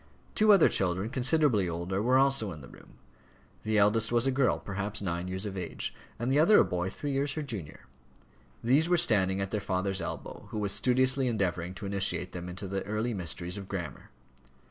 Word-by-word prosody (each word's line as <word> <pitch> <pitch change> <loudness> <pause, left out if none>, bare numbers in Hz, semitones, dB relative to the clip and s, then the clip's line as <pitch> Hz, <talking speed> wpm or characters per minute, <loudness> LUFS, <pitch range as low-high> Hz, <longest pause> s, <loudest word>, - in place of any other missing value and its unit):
Two 215 0 +4
other 195 -5 +7
children, 95 +4 0
considerably 130 - +3
older, 85 +4 -3
were 125 +4 +3
also 135 -6 +2
in 75 -3 -9
the 65 - -11
room. - - -16 0.7
The 110 0 0
eldest 105 +3 +3
was 120 +1 +2
a 135 - +2
girl, 130 -2 +2
perhaps 100 +1 -4
nine 85 -2 -3
years 95 +2 -3
of 100 -2 -5
age, 90 -3 -4 0.2
and 120 +3 -2
the 140 - +3
other 205 +7 +6
a - - +6
boy 90 +1 -2
three 145 +9 -5
years 140 0 -1
her 155 - -4
junior. 100 - -7 0.8
These 140 +8 +3
were 175 - +4
standing 95 - +2
at 95 - -3
their 105 - -2
father's 95 0 -2
elbow, 85 - -6
who - - -6
was 100 -1 -1
studiously 130 +3 +2
endeavouring 90 -5 -2
to 100 - -7
initiate 100 -2 0
them 90 0 -7
in 90 - -7
the 95 0 -4
early 110 +4 -2
mysteries 90 -1 -4
of 100 -2 -8
grammar. 90 -6 -6
100 Hz, 200 wpm, -29 LUFS, 95-130 Hz, 0.8 s, other